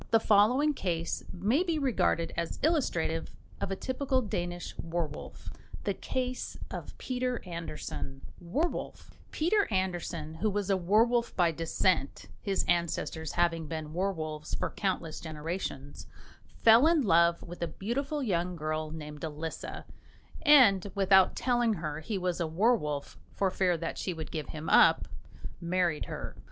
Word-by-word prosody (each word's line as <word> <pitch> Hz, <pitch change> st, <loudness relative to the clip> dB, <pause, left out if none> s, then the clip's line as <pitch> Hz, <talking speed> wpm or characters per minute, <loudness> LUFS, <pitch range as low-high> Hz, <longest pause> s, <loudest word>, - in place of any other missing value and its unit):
The 225 Hz, -, +5 dB
following 235 Hz, +9 st, +4 dB
case 170 Hz, -, -2 dB
may 210 Hz, -, +1 dB
be 340 Hz, -3 st, 0 dB
regarded 250 Hz, -, +1 dB
as 170 Hz, -1 st, -3 dB
illustrative 175 Hz, -, 0 dB, 0.3 s
of -, -, -1 dB
a 195 Hz, -, -1 dB
typical 260 Hz, +2 st, -1 dB
Danish 175 Hz, -4 st, -3 dB
werwolf: 165 Hz, -3 st, -5 dB, 0.3 s
THE -, -, 0 dB
CASE 255 Hz, -1 st, -3 dB
OF -, -, -7 dB
PETER 250 Hz, -1 st, -2 dB
ANDERSEN, 160 Hz, -5 st, -6 dB, 0.2 s
WERWOLF 280 Hz, -, -3 dB, 0.2 s
Peter 400 Hz, +6 st, +2 dB
Andersen, 175 Hz, -5 st, -2 dB
who 205 Hz, +7 st, 0 dB
was 205 Hz, -1 st, -1 dB
a -, -, +4 dB
werwolf 225 Hz, +6 st, +2 dB
by 175 Hz, -2 st, +3 dB
descent, 165 Hz, -1 st, 0 dB
his 195 Hz, -2 st, 0 dB
ancestors 170 Hz, -2 st, -1 dB
having 170 Hz, -2 st, +1 dB
been 155 Hz, -1 st, -5 dB
werwolves 160 Hz, -5 st, -2 dB
for -, -, -2 dB
countless 180 Hz, -5 st, -2 dB
generations, 155 Hz, -3 st, -5 dB, 0.6 s
fell 230 Hz, +6 st, +8 dB
in 325 Hz, -3 st, +4 dB
love 170 Hz, -3 st, +4 dB
with 175 Hz, +1 st, -9 dB
a 170 Hz, -, 0 dB
beautiful 275 Hz, -, -2 dB
young 180 Hz, -5 st, 0 dB
girl 155 Hz, 0 st, -2 dB
named 150 Hz, -2 st, -8 dB
Elisa, 160 Hz, +1 st, -5 dB, 0.6 s
and 220 Hz, -, +6 dB
without 190 Hz, -1 st, +5 dB
telling 240 Hz, -3 st, +2 dB
her 155 Hz, -3 st, -4 dB
he 195 Hz, +6 st, -3 dB
was 180 Hz, -2 st, -1 dB
a 170 Hz, -, 0 dB
werwolf, 160 Hz, -5 st, 0 dB, 0.2 s
for 195 Hz, -2 st, +1 dB
fear 180 Hz, -2 st, +2 dB
that 165 Hz, 0 st, -4 dB
she 180 Hz, -, -2 dB
would 160 Hz, -1 st, -6 dB
give 155 Hz, -3 st, -4 dB
him 155 Hz, 0 st, -6 dB
up, -, -, +6 dB, 0.5 s
married 170 Hz, -2 st, 0 dB
her. -, -, -6 dB
180 Hz, 145 wpm, -30 LUFS, 160-225 Hz, 0.6 s, fell